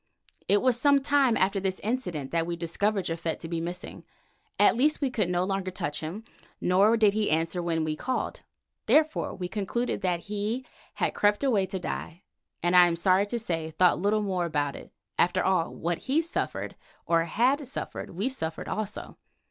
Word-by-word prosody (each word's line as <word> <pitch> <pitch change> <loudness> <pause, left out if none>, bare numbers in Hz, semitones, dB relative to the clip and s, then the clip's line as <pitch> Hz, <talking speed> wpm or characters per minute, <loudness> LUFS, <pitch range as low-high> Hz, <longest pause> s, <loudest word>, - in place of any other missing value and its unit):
It 205 0 +3
was 250 -2 +2
some 280 -1 +4
time 275 -5 +3
after 195 +1 +2
this 190 -1 -2
incident 190 - -3
that 165 0 0
we 170 - -2
discovered 190 +4 -1
Japhet 165 0 -2
to 165 - -6
be 165 0 -2
missing; 175 +2 -6 0.5
at - - +5
least 295 +6 +2
we 275 -3 0
could 210 -7 0
no 180 0 +1
longer 195 0 -1
touch 175 -5 -3
him, 170 +8 -6 0.4
nor 200 +5 +4
did 210 -3 +4
he 215 0 0
answer 165 +3 0
when 165 -2 0
we 155 -1 -1
called. 255 +10 -3 0.5
Therefore, 310 +1 +2
we 180 -1 -4
concluded 215 +4 -2
that 180 -3 0
he 210 +6 -3 0.3
had - - 0
crept 205 +4 +2
away 215 -8 +2
to 190 - -4
die 175 0 -5 0.4
and, 175 +1 +2
I 180 -1 +8
am 170 - 0
sorry 185 +3 +3
to 235 - -2
say, 165 -8 -2
thought 170 +2 +3
little 210 +2 +2
more 185 -3 -1
about 145 -4 -1
it - - -10
for, - - -6
after 175 - +2
all, 185 -3 +2
what 170 0 -2
he 275 +4 +1
suffered, 335 +1 -3 0.3
or 165 -1 +2
had 260 - +1
suffered, 270 - -6
we 195 +7 -2
suffered 160 -12 -4
also. 215 -1 -5
190 Hz, 190 wpm, -27 LUFS, 170-225 Hz, 0.5 s, I